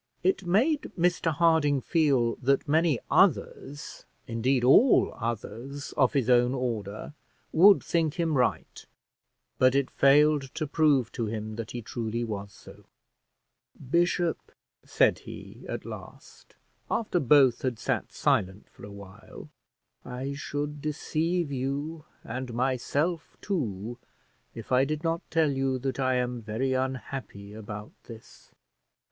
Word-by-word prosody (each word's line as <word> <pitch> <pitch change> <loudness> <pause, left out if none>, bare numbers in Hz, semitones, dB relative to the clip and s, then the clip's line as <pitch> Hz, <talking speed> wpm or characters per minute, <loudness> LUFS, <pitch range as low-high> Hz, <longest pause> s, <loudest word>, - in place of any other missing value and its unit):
It 190 0 +1
made 265 - +1
Mr 175 -1 +1
Harding 155 -3 +3
feel 135 -6 +2
that 135 +3 +1
many 160 -1 +3
others, 145 +1 0 0.2
indeed, 125 +1 0
all 180 - +5
others 120 +4 -5
of 130 -4 +3
his 135 -5 +1
own 125 +1 +4
order, 110 -2 -4 0.4
would 195 +5 +6
think 165 -3 0
him 165 -3 0
right; 125 -2 -1 0.8
but 130 +1 +4
it 140 -1 +1
failed 145 0 +3
to 155 - -2
prove 145 -5 +2
to 115 - -3
him 110 0 -5
that 115 -1 -6
he 120 -2 -6
truly 115 +1 -3
was 100 -3 -5
so. - - -15 0.9
"Bishop," 170 +4 0 0.3
said - - +2
he, - - -11
at - - -5
last, - - -11 0.3
after 210 -6 0
both 135 -4 +4
had 125 -3 -2
sat - - -2
silent 95 +2 0
for - - -17
a 100 - -8
while, 100 -2 -12 0.5
"I 130 +3 -5
should 145 +1 -4
deceive 155 +2 -1
you 140 +4 -3 0.2
and 125 -2 -5
myself 140 +7 -1
too, 120 - -3 0.6
if 115 - -9
I 130 +1 +4
did 155 +3 -3
not 165 0 0
tell 160 -3 +2
you 135 -1 0
that 135 +1 -4
I 130 -1 +1
am 125 -1 -2
very 115 +5 -2
unhappy 130 -5 -4
about 105 -1 -8
this. 115 -2 -14
135 Hz, 130 wpm, -27 LUFS, 120-155 Hz, 0.9 s, would